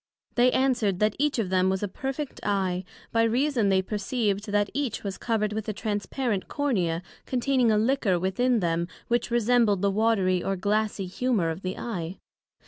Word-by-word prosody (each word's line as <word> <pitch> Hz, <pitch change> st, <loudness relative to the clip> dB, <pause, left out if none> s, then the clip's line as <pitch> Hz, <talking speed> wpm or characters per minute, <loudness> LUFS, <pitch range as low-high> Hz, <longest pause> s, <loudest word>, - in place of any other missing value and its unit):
They 250 Hz, +1 st, +4 dB
answered, 245 Hz, -8 st, +2 dB
That 215 Hz, +2 st, +1 dB
each 295 Hz, -1 st, +1 dB
of 205 Hz, -5 st, -1 dB
them 185 Hz, 0 st, +3 dB
was 190 Hz, +1 st, -1 dB
a -, -, 0 dB
perfect 270 Hz, +8 st, -5 dB
Eye, 190 Hz, -3 st, 0 dB, 0.3 s
by 230 Hz, -, +3 dB
reason 235 Hz, -1 st, +2 dB
they 190 Hz, -1 st, +3 dB
perceived 210 Hz, 0 st, -1 dB
that 205 Hz, -1 st, +1 dB
each 275 Hz, -4 st, -2 dB
was 195 Hz, -2 st, -4 dB
covered 215 Hz, -3 st, 0 dB
with 220 Hz, 0 st, -3 dB
a -, -, -1 dB
Transparent 205 Hz, +1 st, -2 dB
Cornea, 185 Hz, -, 0 dB, 0.2 s
containing 255 Hz, -1 st, +2 dB
a 215 Hz, -, +3 dB
liquor 220 Hz, -4 st, +2 dB
within 225 Hz, +6 st, +1 dB
them, 170 Hz, 0 st, 0 dB, 0.2 s
which 240 Hz, 0 st, +1 dB
resembled 235 Hz, -4 st, +3 dB
the 200 Hz, -, +3 dB
watery 195 Hz, -4 st, +2 dB
or 195 Hz, -, 0 dB
glassie 210 Hz, +1 st, 0 dB
humor 190 Hz, -3 st, 0 dB
of 160 Hz, +4 st, -6 dB
the 185 Hz, 0 st, -4 dB
Eye. 180 Hz, -6 st, -4 dB
210 Hz, 175 wpm, -26 LUFS, 190-240 Hz, 0.3 s, They